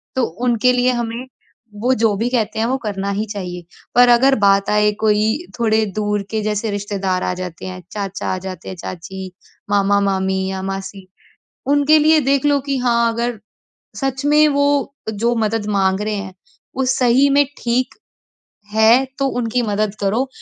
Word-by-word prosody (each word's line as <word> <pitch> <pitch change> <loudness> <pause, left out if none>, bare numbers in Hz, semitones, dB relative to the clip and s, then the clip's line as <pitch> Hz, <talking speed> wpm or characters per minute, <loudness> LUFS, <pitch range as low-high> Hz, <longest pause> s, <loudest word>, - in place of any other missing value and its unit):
तो 260 - +1 0.3
उनके 240 +1 +3
लिए 250 0 +2
हमें 235 +1 -3 0.6
वो 250 +3 +3
जो 220 -2 +2
भी 225 +4 0
कहते 220 -3 -1
हैं 225 - +1
वो 260 +2 0
करना 200 -1 -3
ही 215 - -1
चाहिए। 180 -3 -6 0.3
पर 245 0 +6
अगर 260 +3 +5
बात 200 0 +3
आए 210 0 +3
कोई 215 0 +2 0.3
थोड़े 220 -1 +2
दूर 210 -1 -1
के 220 -1 -1
जैसे 210 +1 -1
रिश्तेदार 195 -2 -2
आ - - -1
जाते 180 -2 -7
हैं, 185 0 -7
चाचा 200 -2 -4
आ - - -2
जाते 185 -1 -7
हैं, 190 - -6
चाची, 185 +2 -7 0.4
मामा-मामी 195 -1 +1
या 190 0 -4
मासी 195 0 -6 0.6
उनके 290 +2 +4
लिए 310 +1 +5
देख 275 0 +2
लो 290 -1 +3
कि 275 -1 0
हाँ, 235 -2 +2
अगर 235 -1 -2 0.6
सच 270 0 -2
में 300 +1 +5
वो 285 -1 +1 0.2
जो 230 +3 0
मदद 220 -1 -1
माँग 195 -1 +1
रहे 215 0 -2
हैं 195 -2 -6 0.4
वो 265 - +1
सही 255 +1 +3
में 285 +1 +4 0.2
ठीक 245 +2 0 0.8
है 225 +4 +5
तो 275 - +1
उनकी 240 +1 0
मदद 210 -2 -1
करो। 220 +7 0
220 Hz, 170 wpm, -19 LUFS, 195-250 Hz, 0.8 s, पर